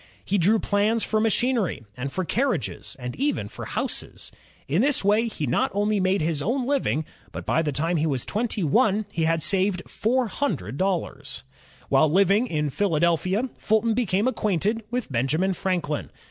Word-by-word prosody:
He 200 +1 +1
drew 205 +6 +4
plans 215 +2 +1
for 215 - +1
ma 225 +1 +3
chinery 235 - 0
and 135 +2 -4
for 185 +3 -2
carriages, 240 - -2
and 125 -1 -6
even 285 +2 0
houses. - - -5 0.4
In - - +2
this 285 -5 +2
way 210 +4 +3
he 155 -9 -3
not 125 - +1
only 205 0 +1
made 185 0 +2
his 155 -2 -1
own 245 - 0
living, 250 - 0 0.3
but - - -7
by 160 - +2
the 155 -2 -1
time 165 +5 0
he 160 +1 +1
was 135 -5 -1
twenty 215 -2 -1
one 215 - +2
he 165 -1 0
had 165 -1 +1
saved 190 -1 +2
four 250 +3 0
hundred 170 - -3
dollars. 190 -1 -2 0.4
While 155 - +4
Uving 200 +7 +3
in 150 - -1
Philadelphia, 175 - +1
Fulton 220 +1 +2
became 215 -2 +1
acquainted 215 -2 0
with 245 - -3
Benjamin 150 +10 +1
Franklin. 175 -6 -2
195 Hz, 170 wpm, -25 LUFS, 160-225 Hz, 0.4 s, drew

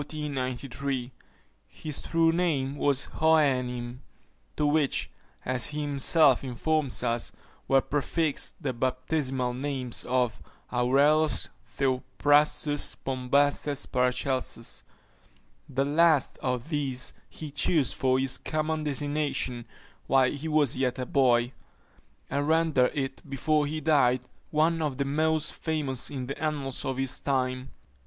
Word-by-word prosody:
His 140 -4 -3 1.3
true 165 -1 +2
name 155 -6 0
was 140 -1 +1
Hohenheim; 125 -6 +1 0.6
to 150 - +1
which, 145 -1 +1 0.3
as 125 -1 +2
he 150 0 -4
himself 145 -1 +3
informs 135 +1 0
us, 120 -1 0 0.4
were 135 0 +4
prefixed 145 +2 -1
the 135 -3 -1
baptismal 130 +1 -1
names 130 -2 -2
of 125 -3 0 0.3
Aureolus 140 +5 +3 0.3
Theophrastus 145 +3 +2
Bombastes 140 +2 0
Paracelsus. 125 -1 -1 0.9
The 135 +2 0
last 155 -1 +3
of 125 +2 -2
these 135 -5 -1 0.2
he 155 -2 -8
chose 150 0 +1
for 130 0 +1
his 130 0 +1
common 155 0 -2
designation 145 -4 -1 0.4
while 130 -1 +4
he 150 +2 -5
was 150 -4 +2
yet 130 -1 0
a 130 - -3
boy; 125 -2 +2 0.7
and 140 +2 -1
rendered 160 -5 +3
it, 135 -1 -3
before 150 +2 +1
he 155 +2 -3
died, 140 -5 +3 0.3
one 160 +2 +2
of 145 -4 -2
the 140 - 0
most 155 +2 0
famous 150 -6 -2
in 135 -3 -5
the 140 +3 -6
annals 145 -3 -2
of 135 -1 -2
his 135 -1 -1
time. 130 -1 -1
140 Hz, 120 wpm, -27 LUFS, 130-150 Hz, 1.3 s, were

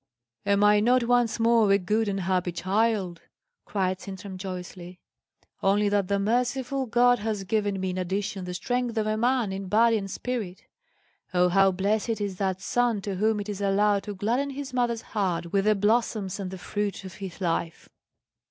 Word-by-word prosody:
"Am 200 0 +3
I 210 0 +6
not 245 +3 +3
once 240 -1 +2
more 230 -2 +4
a 200 - +6
good 210 +4 0
and 195 -1 -1
happy 180 0 0
child!" 190 -1 0 0.4
cried 185 -2 -1
Sintram 195 0 -8
joyously; 180 -1 -7 0.6
"only 205 +1 +3
that 200 -2 +1
the 200 +1 +1
merciful 250 +5 0
God 245 +1 +4
has 210 -2 -2
given 205 -1 -1
me 185 0 -1
in 185 - -3
addition 195 +1 -3
the 180 0 -5
strength 245 +3 -2
of 215 - +1
a 215 0 0
man 240 -2 +1
in 195 0 -5
body 225 +3 +4
and 195 -1 -6
spirit. 215 -4 -4 0.7
Oh, 180 0 +4
how 195 +1 +4
blessed 210 +4 0
is 200 -3 -3
that 190 -1 -1
son 240 +1 +1
to 195 -2 -4
whom 215 +2 +1
it 200 - -7
is 205 -1 -5
allowed 200 +1 +2
to 205 - -5
gladden 240 +8 0
his 275 -1 -6
mother's 240 -2 0
heart 180 -5 -1
with 195 0 +2
the 215 0 +4
blossoms 205 -2 0
and 190 -2 -4
the 190 - -7
fruit 205 +2 -3
of 185 - -8
his 190 -1 -7
life!" 170 -2 -2
205 Hz, 185 wpm, -26 LUFS, 190-225 Hz, 0.7 s, I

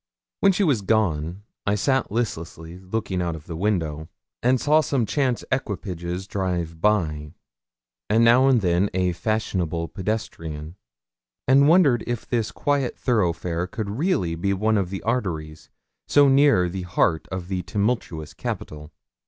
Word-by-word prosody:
When 195 - +5
she 195 +2 +1
was 140 - +2
gone, 95 -4 0 0.2
I 100 - +3
sat 130 +3 +1
listlessly 85 -6 -4
looking 95 -1 -3
out 85 -2 -2
of 80 - -11
the 85 - -6
window, 80 -5 -1 0.3
and 125 +1 +3
saw 150 +4 +4
some 135 -5 0
chance 130 -1 0
equipages 90 - -3
drive 90 -5 -3
by, 80 -8 0 0.7
and 115 +2 +4
now 120 +3 +6
and 130 -4 +4
then 90 +2 +2
a 90 -1 +2
fashionable 85 -3 -2
pedestrian; 85 -6 -4 0.7
and 140 +2 +6
wondered 150 -8 +5
if 120 -1 -3
this 115 -2 -1
quiet 145 -3 -1
thoroughfare 90 -6 0
could 100 +2 -4
really 110 - 0
be 100 +4 -1
one 110 +2 +1
of 95 -3 -2
the 95 0 -5
arteries 85 -10 -3 0.4
so 145 -1 +5
near 135 -9 +5
the 95 +2 -4
heart 85 -2 0
of 95 -2 -4
the 95 -1 -2
tumultuous 90 -3 -2
capital. 75 +1 -6
95 Hz, 145 wpm, -24 LUFS, 85-120 Hz, 0.7 s, now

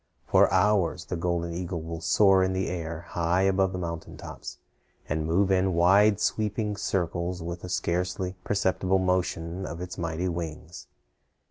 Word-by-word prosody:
For - - +4
hours 95 -3 +2
the 90 - -4
golden 85 0 -1
eagle 85 0 -3
will 80 0 -6
soar 95 +2 +4
in 95 0 0
the 95 0 -1
air 85 -2 -4
high 85 +2 +1
above 95 0 +2
the 95 - -4
mountain 85 -2 -5
tops, - - -8 0.5
and 80 +1 -1
move 95 +4 +2
in 95 -1 +2
wide 100 +4 +5
sweeping 105 -1 -1
circles 90 -3 -2
with 85 +1 -6
a 90 - -6
scarcely 90 +1 -1
perceptible 95 -1 +1
motion 90 -1 -1
of 85 -2 -6
its 90 -1 -6
mighty 85 +1 -2
wings. 85 -1 -6
90 Hz, 155 wpm, -27 LUFS, 85-95 Hz, 0.5 s, wide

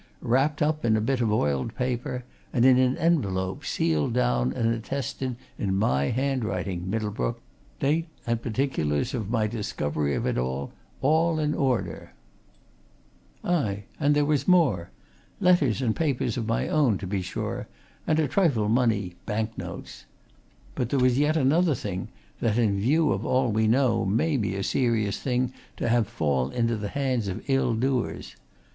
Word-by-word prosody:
Wrapped 140 +5 +2
up 155 0 0
in 110 -2 +3
a - - +2
bit 125 +3 0
of 110 -3 +1
oiled 75 - 0
paper, 125 0 -2 0.3
and 120 -1 +2
in 130 -1 +6
an 130 0 +2
envelope, 95 - 0
sealed 80 -3 0
down 60 +1 +1
and 115 - +1
attested 130 +2 -3 0.2
in 95 -2 0
my 70 -9 +2
handwriting, 110 - -1
Middlebrook 110 +2 -2 0.4
date 155 +4 +1 0.2
and 115 -1 -1
particulars 115 - -1
of 110 -6 -3
my 115 -2 +1
discovery 75 - -2
of - - -2
it, - - 0
all 150 - -1
in 150 -1 0
order. 125 - -1 1.3
Aye, 110 - 0 0.2
and 145 -1 +3
there 145 0 +3
was 145 -2 0
more. 145 - +3 0.5
Letters 160 - +3
and 110 -3 +1
papers 145 -7 0
of 115 -4 -3
my 115 - 0
own, 135 -10 +2
to 100 - -6
be 95 +1 -2
sure, 90 - -4 0.4
and 155 - +2
a 155 -2 +2
trifle 135 - +2
money 110 -6 +1
bank 110 +1 -2
notes. - - -8 0.7
But 120 - -2
there 140 - +1
was 125 0 +3
yet 150 +2 +2
another 155 +3 +3
thing 95 -5 -4 0.3
that, 115 -1 +1
in 105 -4 +2
view 150 +8 +3
of 95 +3 -1
all 125 -1 +1
we 110 +1 +2
know, 115 -1 +3
may 115 +11 +1
be 105 -6 -1
a 100 - -2
serious 115 -5 0
thing 125 -1 -1 0.2
to - - -1
have 115 -2 +3
fall 70 - 0
into 115 +7 0
the 105 -1 -4
hands 130 -5 -1
of 95 - -5
ill 135 -4 +2
doers. 130 +1 -2
115 Hz, 165 wpm, -26 LUFS, 100-135 Hz, 1.3 s, in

